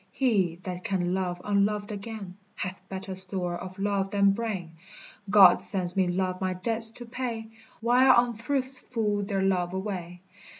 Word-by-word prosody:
He 195 Hz, -10 st, 0 dB
that 180 Hz, -1 st, -6 dB
can 180 Hz, -2 st, -1 dB
love 180 Hz, -2 st, -2 dB
unloved 205 Hz, +1 st, 0 dB
again, 205 Hz, -2 st, -7 dB, 0.2 s
Hath 185 Hz, 0 st, -5 dB
better 190 Hz, 0 st, -6 dB
store 185 Hz, -2 st, +4 dB
of 185 Hz, +2 st, -8 dB
love 195 Hz, -1 st, -1 dB
than 200 Hz, 0 st, +3 dB
brain: 200 Hz, -6 st, -4 dB, 0.6 s
God 195 Hz, -3 st, +7 dB
sends 180 Hz, -3 st, +3 dB
me 190 Hz, -2 st, +2 dB
love 185 Hz, +1 st, -2 dB
my 185 Hz, -1 st, -1 dB
debts 225 Hz, +4 st, 0 dB
to 240 Hz, -, -9 dB
pay, 235 Hz, -2 st, -5 dB, 0.3 s
While 250 Hz, +3 st, +5 dB
unthrifts 255 Hz, +3 st, +2 dB
fool 210 Hz, -4 st, -2 dB
their 195 Hz, -1 st, -2 dB
love 180 Hz, -2 st, 0 dB
away. 185 Hz, -3 st, -5 dB
195 Hz, 155 wpm, -27 LUFS, 185-225 Hz, 0.6 s, God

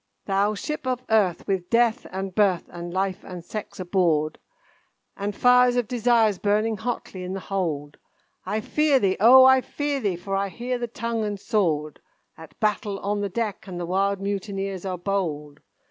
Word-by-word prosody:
"Thou 200 Hz, +2 st, +1 dB
Ship 300 Hz, +5 st, -5 dB
of 255 Hz, -1 st, -1 dB
Earth, 200 Hz, -6 st, +2 dB
with 190 Hz, -3 st, -2 dB
Death, 235 Hz, +1 st, +2 dB
and 190 Hz, 0 st, -4 dB
Birth, 190 Hz, -4 st, +2 dB
and 175 Hz, 0 st, -7 dB
Life, 190 Hz, +2 st, -2 dB
and 180 Hz, -2 st, -9 dB
Sex 215 Hz, 0 st, -7 dB
aboard, 170 Hz, -5 st, +1 dB, 0.8 s
And 205 Hz, 0 st, -4 dB
fires 250 Hz, +1 st, +5 dB
of 245 Hz, -3 st, 0 dB
Desires 230 Hz, -4 st, +2 dB
burning 215 Hz, +2 st, +1 dB
hotly 225 Hz, -4 st, -4 dB
in 180 Hz, +1 st, -4 dB
the 195 Hz, -, -3 dB
hold, 160 Hz, -8 st, -3 dB, 0.5 s
I 210 Hz, +4 st, -2 dB
fear 300 Hz, +4 st, +2 dB
thee, 195 Hz, -6 st, +2 dB
O! 255 Hz, +5 st, +8 dB
I 265 Hz, 0 st, +6 dB
fear 290 Hz, +1 st, -2 dB
thee, 200 Hz, -7 st, -1 dB
for 195 Hz, +3 st, -4 dB
I 195 Hz, 0 st, 0 dB
hear 245 Hz, +4 st, -3 dB
the 240 Hz, -, -2 dB
tongue 230 Hz, 0 st, -3 dB
and 205 Hz, -1 st, -3 dB
sword 155 Hz, -9 st, 0 dB, 0.4 s
At 160 Hz, -1 st, -14 dB
battle 210 Hz, -1 st, 0 dB
on 205 Hz, +1 st, -1 dB
the 200 Hz, -, -2 dB
deck, 215 Hz, 0 st, -3 dB
and 180 Hz, -2 st, -6 dB
the 175 Hz, -, -3 dB
wild 195 Hz, +2 st, 0 dB
mutineers 195 Hz, -1 st, -3 dB
are 185 Hz, -1 st, -3 dB
bold! 160 Hz, -6 st, -3 dB
200 Hz, 175 wpm, -24 LUFS, 185-225 Hz, 0.8 s, O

